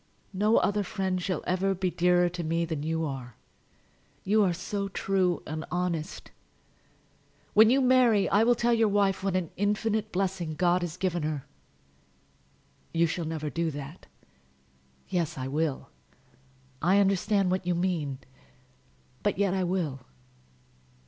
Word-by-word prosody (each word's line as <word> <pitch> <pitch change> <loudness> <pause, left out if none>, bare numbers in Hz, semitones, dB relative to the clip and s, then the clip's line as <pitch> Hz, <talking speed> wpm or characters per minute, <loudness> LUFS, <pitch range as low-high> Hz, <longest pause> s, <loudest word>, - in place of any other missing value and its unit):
No 210 +4 +3
other 205 0 +2
friend 190 -2 -2
shall 185 0 -2
ever 190 +2 0
be 185 0 -1
dearer 180 0 +3
to 175 0 -4
me 165 +1 0
than 160 -3 -4
you 160 +1 -1
are. 130 -5 -6 0.9
You 215 +3 +3
are 185 - +2
so 200 +3 -3
true 185 -2 0
and 155 +1 -5
honest! 175 -1 -3 1.2
When 220 +1 +7
you 270 +3 +4
marry 250 -5 +4
I 205 +2 +3
will 240 +1 +4
tell 235 +1 +2
your 225 -1 +3
wife 200 -2 +1
what 195 -2 0
an 180 -4 -1
infinite 210 +2 0
blessing 180 -4 -2
God 180 +2 +2
has 175 0 -4
given 180 -3 -1
her." 150 -3 -3 1.5
"You 165 0 +2
shall 165 +1 -2
never 155 -2 -4
do 170 -1 -1
that." 145 +2 -8 1.0
"Yes, 165 -3 -2
I 130 0 -3
will. 145 - -2 0.9
I 185 +5 +4
understand 195 -1 +2
what 185 -1 -1
you 175 - +1
mean; 170 -6 -1 1.0
but 205 -3 0
yet 200 -2 +1
I 190 -1 0
will." 175 -7 -1
180 Hz, 145 wpm, -28 LUFS, 165-200 Hz, 1.5 s, When